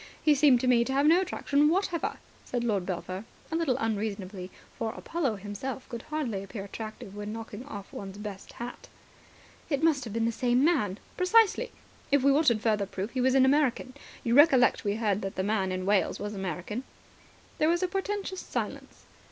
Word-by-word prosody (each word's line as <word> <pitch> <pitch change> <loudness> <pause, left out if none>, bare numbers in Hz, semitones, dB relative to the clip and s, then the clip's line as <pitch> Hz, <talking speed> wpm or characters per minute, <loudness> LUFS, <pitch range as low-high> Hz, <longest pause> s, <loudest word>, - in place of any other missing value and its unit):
He 305 - +6
seemed 280 -3 +5
to 255 - 0
me 240 -2 +5
to 265 - -2
have 280 +2 +3
no 335 +4 +6
attraction 300 -5 +2
whatever," 350 -1 0 0.3
said 245 -1 -3
Lord 205 -6 0
Belpher, 185 +1 -4 0.3
a - - -1
little 315 -7 +1
unreasonably, 200 -4 -3 0.3
for 225 -1 -2
Apollo 290 -8 -2
himself 205 +7 -6
would 235 -1 -5
hardly 255 -11 -3
appear 195 0 -7
attractive 215 -1 -8
when 205 0 -5
knocking 225 +2 -7 0.2
one's 195 -1 -7
best 205 -2 -8
hat 240 +1 -8
off. - - -26
"It 280 -1 0
must 305 -5 +3
have 220 - -6
been 225 0 +1
the 230 - +2
same 245 +3 +2
man." 215 - +2 0.2
"Precisely. 450 +5 +4 0.4
If 280 -2 +4
we 280 - +6
wanted 275 -7 +3
further 210 -3 +1
proof, 200 +3 -4
he 255 - -1
was 260 +1 +3
an 265 -1 +6
American. 265 -2 +2 0.3
You 235 - +1
recollect 270 -2 +6
that - - -11
we 205 0 +1
heard 210 -2 0
that 195 - -4
the 190 - -1
man 195 -2 0
in 185 0 -3
Wales 200 0 +2
was 205 +1 -4
American." 195 +4 -4 0.8
There 310 - +4
was 345 +2 +2
a - - +2
portentous 390 0 -3
silence. - - -5
235 Hz, 195 wpm, -29 LUFS, 205-290 Hz, 0.8 s, He